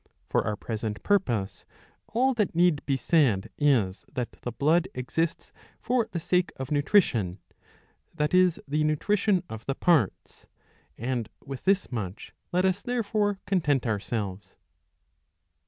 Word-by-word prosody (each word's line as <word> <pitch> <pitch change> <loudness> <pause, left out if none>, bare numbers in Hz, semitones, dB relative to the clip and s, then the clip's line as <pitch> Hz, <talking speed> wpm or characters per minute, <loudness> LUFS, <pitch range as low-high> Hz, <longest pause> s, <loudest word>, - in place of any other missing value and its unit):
'^ - - -44 0.3
For - - +2
our 105 - 0
present 110 0 -4
purpose 120 - 0 0.4
all 260 +3 +2
that 210 -8 0
need 170 -4 +3
be 135 -2 +2
said 130 - +2
is 120 -10 +2
that 125 -2 -3
the 120 - -4
blood 155 +8 +2
exists 160 +6 -2 0.3
for 245 -2 +1
the 170 - -2
sake 180 0 +1
of 130 0 -6
nutri 150 +7 +5
tion, 95 - -3 0.8
that 150 +1 0
is 185 -2 +4
the 150 +2 +1
nutrition 185 +5 +1
of 110 -5 -8
the 135 - 0
parts; 155 - +1 0.5
and 120 -1 -2 0.2
with 135 -2 -7
this 195 -4 +2
much 105 -4 -5 0.2
let 180 +1 +2
us 190 +1 +1
therefore 215 -4 0
content 150 -9 +1
ourselves. 100 -3 -3
150 Hz, 140 wpm, -27 LUFS, 115-185 Hz, 0.8 s, nutri